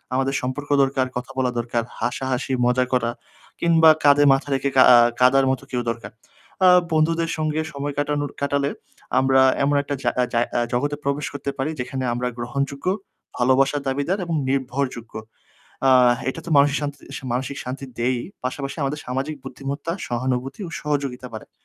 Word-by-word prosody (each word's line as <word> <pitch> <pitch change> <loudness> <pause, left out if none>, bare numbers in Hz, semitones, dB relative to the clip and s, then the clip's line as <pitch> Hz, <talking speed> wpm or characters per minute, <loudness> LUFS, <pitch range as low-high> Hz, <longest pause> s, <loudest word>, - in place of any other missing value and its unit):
আমাদের 135 +1 0
সম্পর্ক 130 +3 -4
দরকার, 135 -1 +1
কথা 125 +2 -6
বলা 125 -1 +1
দরকার, 120 0 -1 0.2
হাসাহাসি, 130 +1 -2
মজা 125 +1 +2
করা 120 -2 +1 0.5
কিংবা 165 -1 +6
কাঁধে 145 0 +6
মাথা 135 +1 -1
রেখে 135 +1 0
কাঁ 130 - +8
আ - - +8 0.2
কাঁদার 135 +1 +5
মতো 130 - -3
কেউ 125 -1 -1
দরকার। 115 0 -8 0.6
আ - - +9 0.2
বন্ধুদের 165 +1 +1
সঙ্গে 155 0 -1
সময় 140 +1 -4
কাটানোর 145 -1 -1
কাটালে 140 0 0 0.5
আমরা 130 0 +4 0.2
এমন 145 +1 +2
একটা 145 0 -3
জা - - +2 0.2
জা 120 - +3 0.3
জগতে 145 +4 0
প্রবেশ 140 +1 -1
করতে 140 0 -4
পারি 140 +4 -1
যেখানে 130 +1 -3
আমরা 125 +1 -2
গ্রহণযোগ্য, 140 +4 -3 0.5
ভালোবাসার 135 +3 +3
দাবিদার 145 +9 -1
এবং 165 -1 -2
নির্ভরযোগ্য। 130 -3 -2 0.7
আ - - +6 0.4
এটা 150 - -5
তো - - -6
মানসিক 140 0 +5
শান্তি 145 -1 -4 0.3
মানসিক 130 +3 -3
শান্তি 135 +2 -6
দেয়ই, 120 0 0 0.2
পাশাপাশি 135 +3 -4
আমাদের 145 +2 -2
সামাজিক 135 +5 -3
বুদ্ধিমত্তা, 140 +4 -5 0.2
সহানুভূতি 130 - -2
ও - - -8
সহযোগিতা 140 -4 -2
বাড়ায়। 110 - -9
135 Hz, 160 wpm, -22 LUFS, 125-145 Hz, 0.7 s, আ